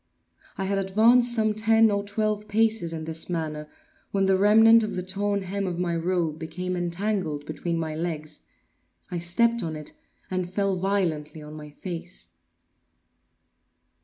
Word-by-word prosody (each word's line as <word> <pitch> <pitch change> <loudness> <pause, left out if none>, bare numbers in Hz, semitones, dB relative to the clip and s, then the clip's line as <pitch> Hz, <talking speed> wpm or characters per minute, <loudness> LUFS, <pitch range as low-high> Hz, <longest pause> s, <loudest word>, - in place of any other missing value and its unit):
I 195 - -2
had 195 +1 0
advanced 230 +6 +4
some 215 -2 +2
ten 225 +1 +4
or 200 0 0
twelve 210 0 -2
paces 220 -4 +1
in 160 -1 -5
this 160 +1 -5
manner, 155 -3 -3 0.4
when 195 -1 +1
the 190 0 +4
remnant 225 +3 +6
of 215 - -2
the 180 - -3
torn 200 +2 -1
hem 195 +1 -3
of 175 -2 -3
my 175 -1 -1
robe 165 -2 -1
became 180 +3 -4
entangled 175 -3 -2
between 170 +2 -3
my 160 -1 -2
legs. 155 -2 -5 0.6
I 175 - -2
stepped 235 +8 +2
on 160 -4 -3
it, 150 -1 -4 0.4
and 185 -1 -2
fell 195 0 0
violently 170 -6 -1
on 150 0 -10
my 150 -1 -9
face. 170 - -7
185 Hz, 155 wpm, -26 LUFS, 165-205 Hz, 0.6 s, remnant